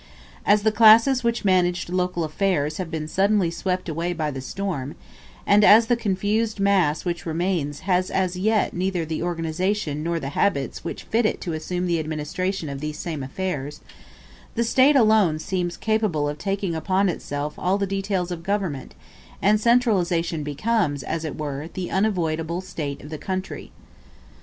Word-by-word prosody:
As 205 0 +4
the 220 - +3
classes 230 +4 +6
which 235 -2 0
managed 180 -2 +2
local 180 -1 -1
affairs 155 -2 0
have 185 -3 -4
been 160 -2 -4
suddenly 195 0 +2
swept 185 +2 -2
away 170 +2 -2
by 155 -3 -2
the 135 -1 -6
storm, 160 -3 -4 0.5
and 205 +1 +5
as 220 +3 +8
the 240 - +2
confused 215 0 -1
mass 190 -7 +2
which 175 -1 -3
remains 160 -3 -1
has 185 -1 +1
as 185 -1 0
yet 210 +3 +1
neither 180 -2 -1
the 160 0 -3
organization 165 -1 -1
nor 170 +1 -1
the 135 - -4
habits 140 -2 -1
which - - -5
fit 225 0 +1
it - - -3
to 170 - -3
assume 175 +3 -3
the 170 -2 +1
administration 155 +4 -3
of 140 -1 -5
these 150 +1 -4
same 160 -3 -4
affairs, 150 0 -4 0.7
the 235 - +1
State 260 +5 +4
alone 215 - +4
seems 175 +2 -3
capable 215 -9 0
of 145 0 -4
taking 195 0 -2
upon 190 +4 +1
itself 150 -4 -3
all 185 +2 +1
the 200 - 0
details 195 -2 -2
of 170 -2 -4
government, 185 -7 -3 0.4
and 210 +2 +3
centralization 185 -9 +2
becomes, 150 - -1
as 160 0 -3
it 155 - -5
were, 145 +1 -4
the 185 -2 -4
unavoidable 170 -5 0
state 155 -6 -5
of 150 - -10
the 155 - -5
country. 190 0 -5
180 Hz, 165 wpm, -23 LUFS, 155-200 Hz, 0.7 s, as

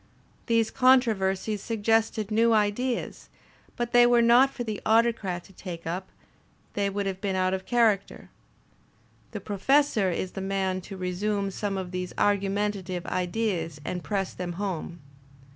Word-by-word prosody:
These 230 -1 +2
controversies 215 -6 +2
suggested 225 -1 0
new 230 +2 +4
ideas, 220 +4 -1 0.5
but 240 -1 -3
they 240 0 +6
were 240 -1 +4
not 245 +3 +6
for 250 - -5
the 215 -3 -4
Autocrat 220 -6 +1
to 195 - -18
take 175 -3 -8
up; 180 +3 -4 0.7
they 200 -1 0
would 200 0 -3
have 190 -1 -4
been 195 -2 -1
out 185 0 +1
of 190 0 -4
character. 220 -5 +1 1.0
The - - -6
Professor 215 0 +2
is 180 +1 -3
the 195 - -6
man 190 -1 -1
to 195 - -7
resume 195 +2 -2
some 200 0 -3
of 185 -2 -5
these 180 -1 -4
argumentative 200 -2 0
ideas 180 -4 -2
and 180 -1 -4
press 195 -3 -2
them 180 -1 -5
home. 175 -3 -4
200 Hz, 145 wpm, -27 LUFS, 185-225 Hz, 1.0 s, they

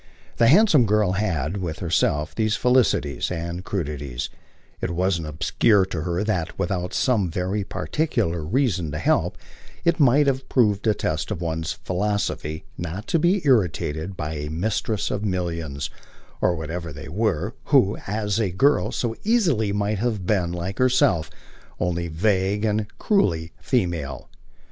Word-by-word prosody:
The 115 - +5
handsome 160 - +6
girl 105 -2 +3
had, 95 -4 -1
with 85 -5 -3
herself, 80 -3 0
these 110 -1 +1
felicities 125 - +2
and 85 +1 -4
crudities: 75 -10 -4 0.5
it - - -1
wasn't 85 -2 0
obscure 95 +6 +2
to 90 -4 -4
her 85 +3 -1
that, 90 -6 -2
without 90 -1 -2
some 110 -9 +2
very 95 +4 -1
particular 100 - -1
reason 95 - 0
to - - -2
help, - - +1 0.5
it 170 0 +3
might 145 +1 +5
have 135 -1 -1
proved 105 -4 +2
a 105 - +4
test - - -2
of - - -3
one's 80 -1 -2
philosophy 90 -5 -2 0.2
not 85 +5 -5
to 165 - +3
be 180 +4 +2
irritated 90 - +1
by 75 0 -3
a 75 -1 -4
mistress 100 +5 -1
of 105 - -2
millions, 85 -7 -3 0.5
or 90 - +3
whatever 80 +1 -5
they 75 +2 -9
were, 105 +3 -1
who, 115 -8 +4
as 105 0 -1
a 105 -4 +1
girl, 135 +12 +2
so 115 -2 -2
easily 170 - +2
might 105 0 0
have 110 -5 -1
been, 90 -4 +1
like 90 +3 -4
herself, 125 - +3 0.5
only 85 -1 -1
vague 95 +4 +1
and 105 0 0
cruelly 85 - +1
female. 85 - -2
95 Hz, 150 wpm, -23 LUFS, 85-110 Hz, 0.5 s, handsome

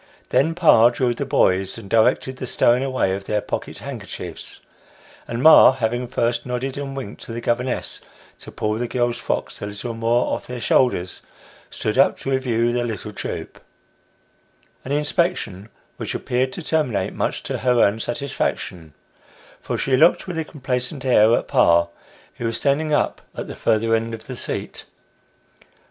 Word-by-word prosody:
Then 160 +4 +2
pa 135 -9 +6
drilled 120 -1 -1
the 140 - -3
boys, 95 -5 +2
and 110 -4 -10
directed 115 +4 +2
the 130 - -5
stowing 120 +1 +3
away 130 -8 0
of 100 +1 -5
their 105 +1 0
pocket - - -5
handkerchiefs, - - -7 0.7
and 120 +2 -3
ma 160 -4 +9
having 120 0 -2
first 120 0 0
nodded 125 +1 -3
and 140 -1 -5
winked 125 -6 -7
to - - -8
the 115 - -4
governess 120 +2 -1 0.4
to - - -10
pull 105 +1 -2
the 120 - -1
girls' 120 -1 -1
frocks - - -3
a 105 - -3
little 105 +4 -5
more 115 +2 +1
off - - -4
their 125 0 -5
shoulders, 115 -8 +1 0.5
stood 110 +4 -2
up 135 - +4
to 135 - -4
review 120 -3 +1
the 120 0 0
little 115 -6 -5
troop - - -6 1.2
an 135 - -6
inspection 145 - -1 0.3
which - - -4
appeared 130 +1 -1
to 175 - -6
terminate 150 -9 0
much - - -2
to - - -3
her 125 -1 +2
own 105 +1 +3
satisfaction, 110 - -3 0.6
for - - -3
she 135 - +1
looked 160 +6 +4
with 175 -3 -4
a - - 0
complacent 130 -2 -4
air 115 -4 +5
at - - -4
pa, 85 0 +4 0.5
who 120 - -4
was 115 - -2
standing 150 +2 +1
up 150 - +1
at - - -5
the - - -7
further 115 +1 +1
end 115 0 0
of 110 - -13
the 130 - -7
seat. - - -4
120 Hz, 170 wpm, -22 LUFS, 115-135 Hz, 1.2 s, ma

